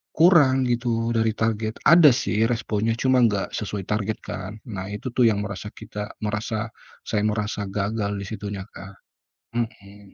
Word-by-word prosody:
kurang 150 -6 +5
gitu 120 -1 0
dari 115 -1 +1
target, 110 0 -1
ada 165 -1 +8
sih 115 -5 +1
responnya 115 -1 0
cuma 130 +1 +3
nggak 105 -5 +2
sesuai 100 -2 -4
target 105 +1 -1
kan. 95 +2 -6 0.2
Nah 95 -1 -5
itu 105 +5 -5
tuh 120 -1 +4
yang 105 -2 +1
merasa 100 +1 -6
kita 105 0 -7
merasa 110 +1 -2 0.3
saya 105 - -1
merasa 105 -1 -2
gagal 100 +1 -2
di 100 - -5
situnya, 100 -1 -5
Kak. 95 -1 -12 0.6
Mhm. 100 -3 -6
110 Hz, 155 wpm, -24 LUFS, 100-115 Hz, 0.6 s, ada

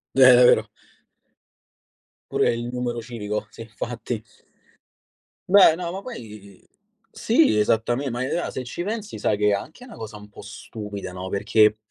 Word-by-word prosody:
Eh, 135 - +3
davvero. 125 0 +7 1.8
Pure - - +2
il 120 0 -4
numero 125 -1 -3
civico, 110 -2 -5
sì, - - -12
infatti. 115 0 -5 1.3
Beh 190 -5 +7
no, 170 0 -4
ma 190 +2 -6
poi 105 - -11 0.5
sì, 235 - +3
esattame 120 +6 +1
ma 120 +2 -3
è 130 - -3
rea 175 - -2
se 130 - -5
ci 125 - -6
pensi 215 +1 -5
sai 105 - +1
che 105 0 +2
è - - +3
anche 155 - -4
na 240 - -12
cosa 110 -1 -8
un 105 0 -12
po' - - -13
stupida, 105 -3 -8
no, 90 +1 -7
perché 105 +2 +3
115 Hz, 155 wpm, -23 LUFS, 105-140 Hz, 1.8 s, davvero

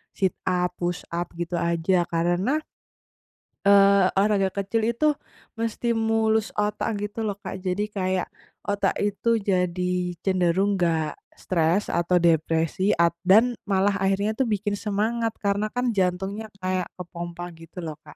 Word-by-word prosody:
sit 190 -2 +1 0.2
up, 180 -1 +1
push 175 0 -2
up 175 +1 -2
gitu 175 +1 -3
aja. 170 +1 +1
Karena, 175 - +1 1.1
eee, 200 -1 +6
olahraga 195 -1 +2
kecil 220 +3 0
itu 305 +5 +3 0.5
menstimulus 225 -1 0
otak 210 +1 -1
gitu 210 +2 -5
loh, 205 - -2
Kak. 190 - -5
Jadi 195 +3 -2
kayak 185 -2 -1 0.4
otak 200 0 0
itu 205 +3 +1
jadi 180 -3 0
cenderung 190 +1 +2
nggak 165 -3 +1 0.2
stres 170 +2 0
atau 170 +1 +1
depresi, 165 +3 +2
a 170 0 +3 0.2
dan 225 +6 +6
malah 200 0 +2
akhirnya 195 +2 +1
tuh 265 - +2
bikin 205 -1 -1
semangat 225 +2 -1
karena 200 +1 +1 0.2
jantungnya 195 +2 -1 0.2
kayak 185 -1 0
kepompa 175 0 -7
gitu 165 +2 -10
loh, 155 -2 -5
Kak. - - -14
190 Hz, 130 wpm, -25 LUFS, 175-210 Hz, 1.1 s, eee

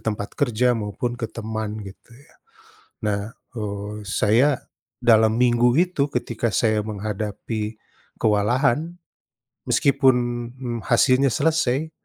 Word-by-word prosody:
tempat 105 -2 -3
kerja 125 -2 +2
maupun 115 +3 -3
ke 115 -2 -5
teman 110 -1 -4
gitu 100 +3 -12
ya. 135 +4 -19 0.7
Nah, 100 -1 0 0.3
eee, 105 -2 -5
saya 110 +7 +3 0.5
dalam 110 -1 +5
minggu 120 0 +3
itu 175 -5 +2
ketika 120 -2 -2
saya 110 0 +2
menghadapi 105 +1 -4 0.4
kewalahan 120 +9 +1 0.7
meskipun, 135 -3 +4 0.4
mmm, 120 -3 -4
hasilnya 130 +1 +3
selesai, 155 -1 +1
115 Hz, 105 wpm, -23 LUFS, 105-130 Hz, 0.7 s, dalam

